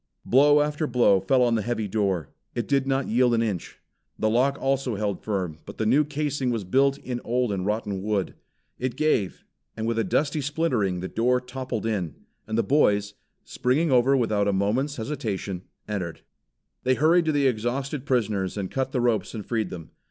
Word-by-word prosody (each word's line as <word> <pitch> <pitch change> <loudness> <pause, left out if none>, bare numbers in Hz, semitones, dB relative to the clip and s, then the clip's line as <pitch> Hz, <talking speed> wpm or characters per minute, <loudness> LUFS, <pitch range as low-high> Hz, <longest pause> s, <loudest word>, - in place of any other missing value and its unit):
Blow 145 +3 +5
after 150 +1 -1
blow 120 -6 +4
fell 125 +7 +3
on 120 -1 +2
the 110 - +1
heavy 110 -1 -2
door. 95 -6 -1 0.3
It 120 - -2
did 135 -1 +1
not 135 0 0
yield 120 +1 +3
an 115 - +2
inch. 100 -7 -4 0.4
The 110 - +1
lock 135 +4 +2
also 135 -3 0
held 100 -2 -2
firm, 90 -7 -2
but - - -10
the 110 - -1
new 135 +7 +4
casing 145 -3 -2
was 115 -4 -1
built 135 +8 +2
in 125 -3 -5
old 125 -1 0
and 95 -1 -2
rotted 105 -2 -2
wood. 100 -2 -1 0.5
It 125 -1 -2
gave, 145 -10 0 0.3
and 110 - -2
with 115 0 0
a - - +2
dusty 145 +9 0
splintering 130 - 0
the 95 - -3
door 125 +4 +1
toppled 125 -3 -5
in, 95 -9 -2 0.3
and 110 0 -2
the 115 - +3
boys, 105 -8 +2 0.3
springing 145 +5 0
over 130 +2 +4
without 105 -4 +1
a 100 - +2
moment's 115 +9 0
hesitation, 105 -7 -4 0.2
entered. 90 -6 -4 0.6
They 130 0 +2
hurried 165 +4 +4
to 160 - +2
the 145 -2 +2
exhausted 130 +4 -1
prisoners 105 -7 0
and 95 -2 -3
cut 130 0 -2
the 125 - +1
ropes 120 -1 0
and 105 - -6
freed 110 -5 -1
them. 85 -3 -9
120 Hz, 190 wpm, -25 LUFS, 105-135 Hz, 0.6 s, Blow